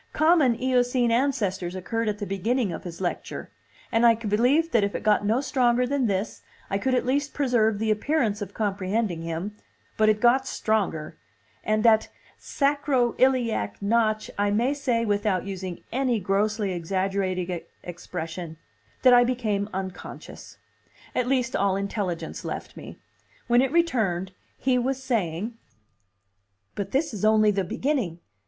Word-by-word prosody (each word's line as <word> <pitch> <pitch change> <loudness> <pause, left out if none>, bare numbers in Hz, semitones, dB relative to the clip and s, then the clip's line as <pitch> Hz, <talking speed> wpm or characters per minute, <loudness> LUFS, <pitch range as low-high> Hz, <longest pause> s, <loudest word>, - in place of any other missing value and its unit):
Common 310 -6 +4
Eocene 250 -1 +2
ancestors 225 -8 0
occurred 225 +4 -2
at 210 - -2
the 205 - -4
beginning 205 +3 0
of - - -7
his 170 0 -7
lecture; 180 - -4 0.4
and 225 0 +2
I 230 -1 +7
believed 245 +9 +2
that 225 -3 +3
if 200 - -1
it - - -4
got 210 -1 +3
no 230 +5 +2
stronger 250 -3 +2
than 270 -1 0
this, 200 +1 -2 0.3
I 195 - +1
could 260 +4 +1
at 250 - 0
least 285 +3 -1
preserve 235 -6 +2
the 220 +1 0
appearance 215 -2 0
of 205 - -6
comprehending 200 -3 -1
him; 165 +5 -4 0.4
but 215 0 +4
it 215 0 +2
got 255 +3 +4
stronger, 190 -8 -1 0.5
and 215 +1 +1
at 220 -1 +5 0.3
sacro 280 -4 +1
iliac 235 - +1
notch 215 +1 +1
I 205 0 +2
may 235 +7 +1
say, 250 -5 0
without 205 -3 0
using 185 -2 -6
any 255 -2 +1
grossly 205 +2 0
exaggerated 185 0 -2 0.2
expression, 170 -1 -6 0.5
that 255 -1 +7
I 245 0 +7
became 215 -5 -1
unconscious. 190 -1 -8 0.6
At 250 - 0
least, 255 -2 0
all 200 -1 +2
intelligence 195 -3 -3
left - - -6
me. - - -10 0.5
When 240 +1 +4
it 265 0 0
returned, 220 - +1 0.3
he 255 -1 +1
was 265 +2 -2
saying. 220 -1 -2 1.1
"But 200 -1 -4
this 280 +3 0
is 210 - -6
only 215 -1 +5
the 195 -1 0
beginning. 230 - -1
215 Hz, 150 wpm, -25 LUFS, 195-250 Hz, 1.1 s, I